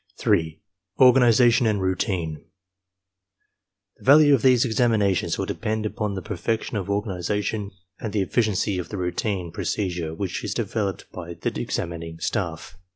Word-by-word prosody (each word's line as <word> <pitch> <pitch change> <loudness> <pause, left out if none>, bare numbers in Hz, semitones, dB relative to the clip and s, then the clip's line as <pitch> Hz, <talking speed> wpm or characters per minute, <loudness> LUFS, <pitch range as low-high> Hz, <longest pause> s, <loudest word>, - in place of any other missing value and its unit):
3. 80 -1 +1 0.4
ORGANIZATION 120 -2 +5
AND 105 -2 +1
ROUTINE 90 -4 -2 1.5
The - - -19
value 145 +2 +7
of 135 - +3
these 125 0 +4
examinations 110 -5 +1
will - - -1
depend 110 0 -3
upon 105 -1 -2
the 95 - -5
per 105 - -5
fection 115 +5 -2
of 100 -1 -3
organization 100 +1 -2 0.3
and 110 - -4
the 100 -1 +1
efficiency 100 -2 0
of 90 - -6
the 105 - -5
routine 90 0 -2
pro - - -5
cedure 85 -5 -2
which 95 -1 -3
is - - -3
developed 100 -3 -2
by 85 -1 -8
the - - -3
examining 85 -1 -4
staff. 90 -1 -4
100 Hz, 150 wpm, -24 LUFS, 90-110 Hz, 1.5 s, value